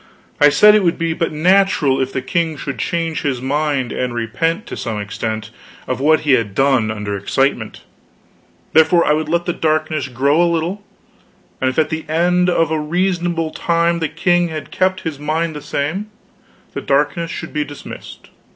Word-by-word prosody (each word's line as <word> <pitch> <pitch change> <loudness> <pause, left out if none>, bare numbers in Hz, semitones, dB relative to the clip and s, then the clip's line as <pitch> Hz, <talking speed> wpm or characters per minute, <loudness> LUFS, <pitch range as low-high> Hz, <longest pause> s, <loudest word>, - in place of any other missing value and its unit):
I 145 - +7
said 210 +9 +6
it 215 - +4
would 170 -2 +1
be 165 -1 -1
but 165 +1 -1
natural 155 -4 +3
if 130 0 -1
the 130 - -3
king 160 +2 -1
should 135 -1 -5
change 165 -2 -2
his 135 -4 -1
mind 140 -1 -1
and 125 -1 -3
repent 165 - -1
to - - -7
some 110 -4 -4
extent 110 +1 -4 0.4
of 130 - -2
what 155 +3 +3
he 150 - +1
had 115 -6 +2
done 130 -4 +2
under 105 -1 -3
excitement; 110 +3 -1 0.9
therefore 160 +2 +5
I 150 - +3
would 155 0 -1
let 170 +1 0
the 175 - -1
darkness 155 -3 0
grow 140 +5 +2
a 175 - +4
while, 170 +4 -1 0.8
and 130 - +2
if 130 - -6
at 155 -1 +2
the 160 0 -3
end 180 +3 +2
of 165 -2 +1
a 160 - 0
reasonable 175 0 -1
time 170 +1 +1
the 160 -2 -1
king 175 +1 +1
had 155 -2 -7
kept 185 0 0
his 160 -6 -5
mind 155 +2 -1
the 150 - -6
same, 175 +12 -3 0.6
the - - -4
darkness 145 +4 0
should - - -6
be 150 -1 0
dismissed. 145 -1 -10
155 Hz, 185 wpm, -18 LUFS, 135-170 Hz, 0.9 s, I